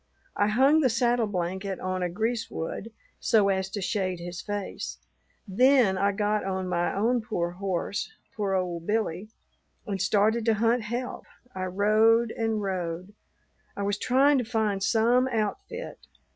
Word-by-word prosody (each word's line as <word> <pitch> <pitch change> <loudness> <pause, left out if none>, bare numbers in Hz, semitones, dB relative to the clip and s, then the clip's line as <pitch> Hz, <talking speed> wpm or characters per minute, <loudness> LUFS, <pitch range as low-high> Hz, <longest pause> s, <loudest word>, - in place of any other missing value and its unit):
I 205 - +2
hung 265 +8 +4
the 260 - +3
saddle 240 -1 +2
blanket 190 0 -3
on 185 0 -2
a 180 - 0
greasewood 220 0 -3 0.3
so 215 -4 +3
as 190 -1 0
to 200 0 -4
shade 185 -3 -1
his 175 +1 -6
face; 205 -1 -5 0.5
then 245 0 +4
I 200 +2 +2
got 210 +1 0
on 190 -1 -2
my 175 -1 0
own 235 +4 +1
poor 175 -6 -2
horse, 190 +2 -3 0.2
poor 200 -3 0
old 175 -2 -2
Billy, 210 -2 -1 0.6
and 195 -5 -3
started 215 +4 +2
to 225 -2 +3
hunt 230 +3 +2
help. 240 +4 -4 0.3
I 185 0 -3
rode 215 +4 +3
and 225 -1 -1
rode. 185 0 -3 0.6
I 200 - -2
was 200 0 -1
tryin' 270 +2 +4
to - - 0
find 215 -4 -1
some 230 +5 +3
outfit. 260 - -3
205 Hz, 150 wpm, -27 LUFS, 190-230 Hz, 0.6 s, hung